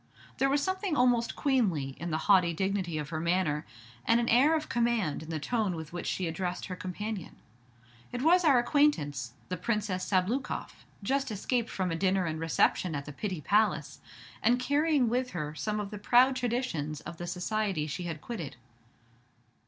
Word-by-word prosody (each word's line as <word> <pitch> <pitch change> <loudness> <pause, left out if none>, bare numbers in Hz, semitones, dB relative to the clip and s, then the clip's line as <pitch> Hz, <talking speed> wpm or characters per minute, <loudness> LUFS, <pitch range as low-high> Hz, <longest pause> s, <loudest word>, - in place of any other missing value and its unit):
There 270 - +3
was 285 +1 +2
something 375 -1 -1
almost 245 -2 +3
queenly 205 - +1
in 175 - -4
the 155 - 0
haughty 180 -5 +5
dignity 190 -2 -1
of 150 -2 -4
her 155 -1 -3
manner, 170 -2 0 0.4
and 230 - +4
an 235 - 0
air 275 +7 +5
of 310 -1 -2
command 230 -11 0
in 160 - -10
the 160 -1 -2
tone 210 +2 0
with 160 0 -7
which 175 - -4
she 185 - -1
addressed 175 +2 -3
her 185 - -5
companion. 190 +1 -5 0.8
It 245 +1 -3
was 355 +3 +5
our 285 -6 +6
acquaintance 150 - +1 0.2
the 180 - -2
Princess 200 -1 -1
Sabloukoff, 205 +8 -1 0.2
just 270 +6 0
escaped 230 +3 -1
from 185 -2 -2
a - - 0
dinner 190 +1 +1
and 160 -1 -3
reception 165 +1 +1
at 140 -1 -4
the 145 - -8
Pitti 185 0 -4
Palace, 210 +7 +1 0.4
and 240 +3 +4
carrying 285 0 +2
with 250 +2 0
her 150 -2 -3
some 210 +7 -2
of 205 -1 -4
the 210 - -6
proud 250 +5 +5
traditions 235 - -2
of 170 - -8
the 175 - -5
society 185 -2 -1
she 155 +4 -4
had 160 -3 -5
quitted. 165 - -6
195 Hz, 180 wpm, -30 LUFS, 165-245 Hz, 0.8 s, our